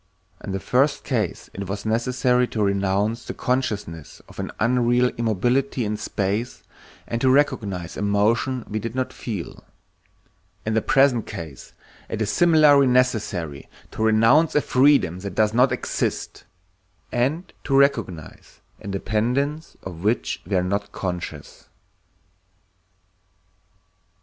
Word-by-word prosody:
In - - -5
the 95 - -2
first 130 +8 +1
case - - -2
it 100 0 -6
was 100 +2 -4
necessary 125 +2 +1
to 110 -3 -2
renounce 100 +3 0
the - - -7
consciousness 105 - -3
of - - -13
an - - -3
unreal 120 +1 +3
immobility 120 +4 0
in 105 +1 -1
space 105 +4 -3 0.4
and 115 0 -3
to 130 - +4
recognize 100 - +1
a - - -5
motion 110 +5 +1
we 110 - -3
did 115 +2 -5
not 130 0 -2
feel; 105 -8 -6 1.0
in 110 - -1
the 110 - +2
present 135 -3 +3
case 80 -5 -8 0.4
it 115 - -4
is 110 - 0
similarly 155 -5 +5
necessary 105 - 0 0.2
to - - -6
renounce 115 +9 +4
a 150 - +4
freedom 130 - +3
that 95 -1 -6
does 110 0 +2
not 125 +3 +4
exist, - - -3 0.7
and 140 +9 -1
to 135 - +1
recognize 115 - -1 0.2
a - - -9
dependence 125 +10 -1
of 90 -2 -8
which 110 +4 0
we 100 - -1
are 90 - +2
not 100 +2 -2
conscious. 90 -2 -6
115 Hz, 130 wpm, -23 LUFS, 100-130 Hz, 1.0 s, similarly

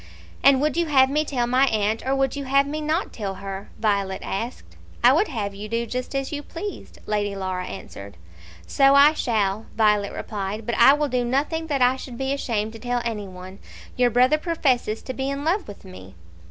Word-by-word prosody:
"And 275 -1 +6
would 300 -1 +1
you 340 -1 +1
have 265 -3 +4
me 300 +2 +2
tell 255 -5 -1
my 255 +3 +3
aunt, 215 -1 0
or 265 +1 0
would 270 0 0
you 280 -1 -5
have 275 +1 +3
me 300 +2 -4
not 315 +5 -1
tell 200 -4 -4
her?" 195 +1 -7
Violet 200 -3 0
asked. 230 +6 -5 0.3
"I - - +7
would 420 - +2
have 210 -7 -4
you 205 +2 -8
do 230 +1 -1
just 250 +4 -5
as 275 0 -2
you 295 -1 -3
pleased," 385 +7 -8
Lady 205 -1 -1
Laura 185 -1 -3
answered. 100 - -9 0.5
"So 275 0 +4
I 285 +2 +7
shall," 215 -6 -1
Violet 210 -2 +2
replied, 210 +1 -5
"but 235 - -2
I 270 - +7
will 295 0 0
do 250 -2 0
nothing 295 +6 -1
that 280 -4 +1
I 250 +1 +3
should 255 -2 -9
be 270 +1 -1
ashamed 220 -5 -2
to 225 - -10
tell 245 0 -2
any 210 -4 -3
one. 185 +1 -11 0.4
Your 250 -1 +3
brother 255 +6 +3
professes 265 -10 0
to 260 - -5
be 265 +1 -3
in 280 +1 -3
love 360 +4 0
with 205 -1 -11
me." 95 - -12
245 Hz, 210 wpm, -23 LUFS, 205-275 Hz, 0.5 s, I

